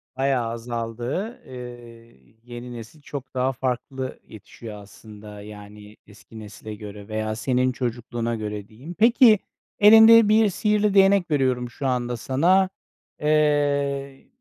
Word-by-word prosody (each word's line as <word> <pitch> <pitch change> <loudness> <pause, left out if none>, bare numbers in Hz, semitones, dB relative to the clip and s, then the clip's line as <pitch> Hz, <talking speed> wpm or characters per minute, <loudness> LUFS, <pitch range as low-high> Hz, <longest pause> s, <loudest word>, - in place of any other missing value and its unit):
Bayağı 135 -2 0
azaldı. 120 - -5
Eee, 115 - -12
yeni 120 0 -9
nesil 115 +6 -11
çok 140 -2 -8
daha 130 +1 0
farklı 130 +1 -4
yetişiyor 110 0 -11
aslında, 105 0 -13
yani 105 0 -12
eski 110 +1 -14
nesile 105 0 -9
göre 105 -1 -10
veya 110 0 -3
senin 130 +2 0
çocukluğuna 120 -1 -3
göre 105 -2 -6
diyeyim. 130 +11 -11
Peki, 230 -2 +6 0.4
elinde 220 +1 +8
bir 215 -1 +4
sihirli 210 +1 +1
değnek 195 -3 +4
veriyorum 130 -4 0
şu 135 +3 -5
anda 120 -1 -1
sana. 180 +10 +2 0.5
Eee, 145 -2 0
125 Hz, 120 wpm, -23 LUFS, 110-150 Hz, 0.5 s, elinde